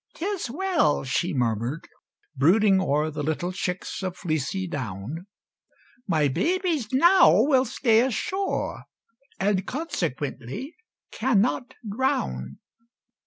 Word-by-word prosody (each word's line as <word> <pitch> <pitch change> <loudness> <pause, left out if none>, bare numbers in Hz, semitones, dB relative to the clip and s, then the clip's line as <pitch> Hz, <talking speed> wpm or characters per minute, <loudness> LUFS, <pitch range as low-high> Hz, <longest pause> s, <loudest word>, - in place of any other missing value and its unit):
"'Tis 380 -4 -3
well," 335 - +1
she 165 +7 -1
murmured, 120 +1 -1 0.5
brooding 190 +7 +4
o'er 150 -2 0
The 150 0 -4
little 160 +4 -2
chicks 180 0 -4
of 185 -1 -4
fleecy 170 +2 -2
down, 135 - -5 0.8
"My 155 -6 +2
babies 330 - 0
now 335 - +6
will 265 -2 +3
stay 230 -2 +2
ashore, 375 - -2 0.5
And, 195 -1 +1
consequently, 200 - -4 0.4
cannot 245 +1 0
drown!" 70 - -2
190 Hz, 100 wpm, -25 LUFS, -, 0.8 s, now